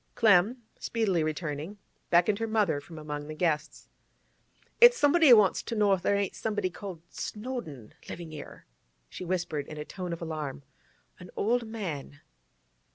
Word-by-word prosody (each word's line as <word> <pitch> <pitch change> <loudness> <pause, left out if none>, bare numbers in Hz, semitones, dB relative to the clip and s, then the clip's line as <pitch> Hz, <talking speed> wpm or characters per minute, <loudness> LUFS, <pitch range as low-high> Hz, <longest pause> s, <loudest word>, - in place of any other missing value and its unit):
Clem, 220 +3 +4 0.2
speedily 200 -8 0
returning, 155 +4 -4 0.3
beckoned 180 +4 +3
her 225 - -1
mother 210 -10 +1
from 165 +2 -12
among 150 -1 -6
the 155 - -6
guests. 155 -2 -1 0.9
'It's 485 +1 +8
somebody 305 - +5
wants 210 -5 +6
to 230 - -5
know 205 -2 +4
if 190 - 0
there 200 - +2
ain't 200 -2 -1
somebody 210 -4 -2
called 180 -4 -8
Snowdon 210 - -6 0.2
livin' 165 -2 -7
'ere,' 150 - -10 0.4
she - - -8
whispered 175 -5 -2
in 155 - -8
a 150 - -5
tone 180 +1 -6
of 170 - -4
alarm. 150 -4 -5 0.6
'An 180 -1 -11
old 235 +2 +1
man. 170 -10 -6
180 Hz, 155 wpm, -29 LUFS, 155-215 Hz, 0.9 s, It's